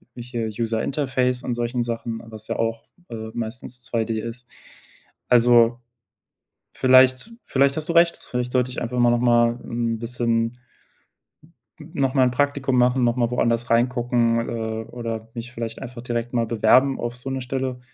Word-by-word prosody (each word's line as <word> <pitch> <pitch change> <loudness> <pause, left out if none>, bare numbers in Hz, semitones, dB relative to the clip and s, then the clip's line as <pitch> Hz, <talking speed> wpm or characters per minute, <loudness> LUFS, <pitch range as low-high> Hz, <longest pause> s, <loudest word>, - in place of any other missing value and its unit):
hm, 120 - -7
hier 120 -2 -4
User 115 -1 -1
Interface 130 -3 0
und 125 - -2
solchen 120 +1 -1
Sachen, 115 -1 -4
was 110 -1 -9
ja - - -3
auch, 115 0 -2 0.2
äh, 110 -1 -6
meistens 120 +2 -4
2D 115 -1 -1
ist. 115 +2 -7 0.8
Also, 120 0 +5 0.9
vielleicht 130 - +4
vielleicht 140 +1 +2
hast 155 +2 -3
du - - +1
recht. 170 0 +4
Vielleicht 125 0 -4
sollte 125 0 +1
ich - - -5
einfach 125 +1 -2
mal 120 0 +5
nochmal 120 0 +3
'n 115 -1 -2
bisschen 115 0 -1 1.2
n 155 +2 -12
nochmal 135 -3 +2
'n - - +2
Praktikum 140 -1 0
machen, 125 +1 +3
nochmal 120 0 +1
woanders 120 0 0
reingucken, 120 -1 +2
äh, 110 -1 -3
oder 115 -2 -5
mich 120 +1 -7
vielleicht 115 -1 -6
einfach 125 -2 -8
direkt 120 -1 -3
mal 115 -1 +1
bewerben 120 +5 +3
auf 120 0 -4
so 125 +2 -6
'ne 130 0 -2
Stelle, 130 0 -3
120 Hz, 160 wpm, -23 LUFS, 115-125 Hz, 1.2 s, Also